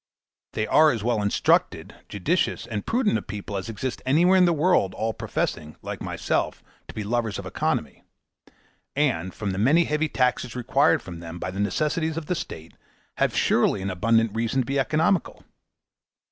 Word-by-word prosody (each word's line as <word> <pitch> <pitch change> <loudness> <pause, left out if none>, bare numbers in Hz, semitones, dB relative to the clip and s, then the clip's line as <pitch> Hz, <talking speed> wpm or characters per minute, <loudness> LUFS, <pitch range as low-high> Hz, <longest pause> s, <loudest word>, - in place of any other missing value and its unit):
They 110 - -1
are 155 +7 +5
as 115 -7 -1
well 115 -2 +1
instructed 100 0 +1 0.2
judicious, - - 0
and 105 - -5
prudent 225 -3 +2
a - - -8
people 105 -1 -7
as 95 +3 -4
exist 115 +4 -4
anywhere 165 +8 +4
in 185 -1 +6
the 175 - +3
world 155 - +2
all 110 0 -1
professing, 75 -6 -3
like - - -6
myself, - - -2 0.2
to - - -11
be 110 - -3
lovers 110 0 -1
of - - -7
economy; - - -2 0.9
and, 125 - 0
from 105 0 -4
the 95 - -3
many 145 +11 +4
heavy 150 0 0
taxes 125 -2 0
required 135 +5 +2
from 85 -2 -8
them 85 0 -8
by 95 - -4
the 95 - -6
necessitities 155 - 0
of 165 - -4
the 180 - -1
state, 80 - -7 0.4
have - - +1
surely 95 - +2
an 95 - -2
abundant 115 +3 +2
reason 115 +4 0
to - - -3
be 140 +3 -1
economical. 155 +5 0
120 Hz, 175 wpm, -25 LUFS, 100-155 Hz, 0.9 s, in